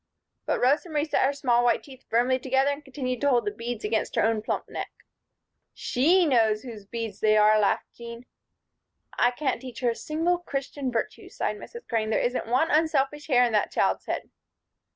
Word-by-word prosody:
But - - 0
Rosa 285 +7 +2
Marie 300 -1 0
set 310 - +1
her - - +1
small 245 -4 +1
white 240 -2 +2
teeth 265 -2 -14
firmly 245 +3 +2
together 265 +2 +1
and 285 +1 -6
continued 255 -3 -4
to 285 - +3
hold 240 -4 +2
the 205 - -1
beads 230 +2 -6
against 220 +1 -1
her - - +2
own 225 -1 +1
plump 215 - -3
neck. - - -5 0.9
"She 340 +9 +3
knows 225 -6 +2
whose 220 -6 -9
beads 225 -2 -5
they 215 0 +3
are," 215 0 +5
laughed 205 - 0
Jean. 235 +1 -10 0.9
"I 245 - +5
can't 260 +2 -2
teach 255 -1 -9
her 245 -2 +2
a - - -5
single 330 +6 -1
Christian 275 -4 -4
virtue," 230 - -4
sighed - - -3
Mrs. 470 -1 -11
Crane. 220 -2 -1
"There 220 - +1
isn't 245 -1 -1
one 260 +8 +2
unselfish 295 -2 +1
hair 250 -4 +4
in 240 - -1
that 210 -1 +1
child's - - 0
head." - - -4
250 Hz, 195 wpm, -26 LUFS, 230-285 Hz, 0.9 s, are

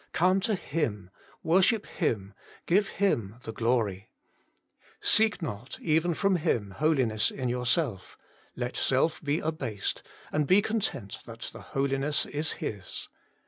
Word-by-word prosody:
Come 185 +3 +4
to 215 +2 0
Him; 115 - -3 0.3
worship 190 +6 +3
Him; 105 - -2 0.3
give 195 +4 +3
Him 115 - 0
the 110 - -6
glory. 110 -4 0 0.9
Seek 215 -4 +4
not, 120 -3 -5
even 165 +1 +2
from 195 0 +2
Him, 120 - 0
holiness 125 -4 +2
in 125 -2 -3
yourself; 125 - 0 0.4
let 125 0 -3
self 135 +5 +1
be 145 +1 +1
abased, 135 - -2 0.3
and 150 -1 +1
be 185 +6 +6
content 205 - -2
that 115 0 -7
the - - -9
Holiness 135 +2 0
is 150 +1 -2
His. 100 -3 -6
140 Hz, 130 wpm, -28 LUFS, 110-170 Hz, 0.9 s, be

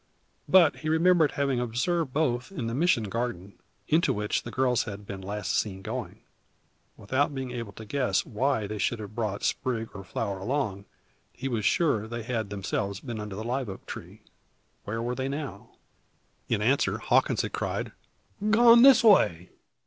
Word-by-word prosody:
But 175 -6 +6
he 155 - -4
remembered 160 -1 +4
having 140 -3 0
observed 130 +6 -1
both 125 -1 0
in 140 -12 -4
the 115 - -3
Mission 145 -4 +2
garden, 100 -3 -4 0.3
into 160 +3 +3
which 105 0 -1
the - - -8
girls 130 -2 +1
had 105 -1 -7
been 100 -1 -7
last 100 0 -3
seen 95 -3 -2
going. - - -5 0.8
Without 135 +7 0
being 130 -2 -4
able 115 -4 -5
to 110 - -10
guess 105 -5 0
why 110 -1 0
they 105 +1 -5
should 120 +5 0
have 105 -1 -8
brought 105 -3 -3
sprig 115 -3 -1
or 100 - -8
flower 100 +1 -3
along, 100 -3 -2 0.5
he 135 - -5
was 115 -6 -2
sure 110 - +2
they 120 0 -5
had 110 -3 -3
themselves 100 0 -3
been 120 -3 -6
under 105 -2 -6
the 110 - -5
live 125 0 -2
oak. 95 - -9 1.0
Where 115 +2 -3
were 120 +1 -2
they 130 +1 -3
now? 140 -8 -6 0.8
In - - +1
answer, - - +2
Hawkins - - +2
had - - -5
cried: - - -3 0.6
"Gone 235 +2 +7
this 270 -1 +8
way! 90 - +4
120 Hz, 170 wpm, -27 LUFS, 105-140 Hz, 1.0 s, this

